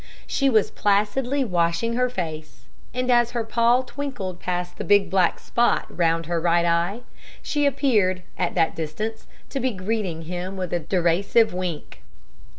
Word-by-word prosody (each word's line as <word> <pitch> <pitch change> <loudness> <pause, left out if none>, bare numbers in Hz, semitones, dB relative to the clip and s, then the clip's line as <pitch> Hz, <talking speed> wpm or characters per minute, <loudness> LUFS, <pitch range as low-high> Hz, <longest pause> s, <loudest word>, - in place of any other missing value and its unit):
She 275 -1 +1
was 220 -5 +3
placidly 235 +7 +1
washing 175 +3 0
her 250 +1 +1
face; 155 - -6 0.3
and 250 +1 -1
as 240 -1 +3
her 230 - 0
paw 235 +3 +2
twinkled 255 -11 -5
past 180 -1 -3
the - - -2
big 200 -3 +3
black 185 -2 +3
spot 240 0 +1
round 165 -1 +1
her 170 0 -1
right 170 0 +3
eye, 170 +6 +1 0.4
she 290 -1 +1
appeared, 210 -10 +1
at 180 - -2
that 165 - +2
distance, 210 +8 -4 0.2
to 275 - -2
be 260 0 +1
greeting 190 -5 -3
him 180 +3 -5
with 180 -2 -4
a 175 - +1
derisive 180 +6 +2
wink. 175 - -5
190 Hz, 155 wpm, -24 LUFS, 170-235 Hz, 0.4 s, was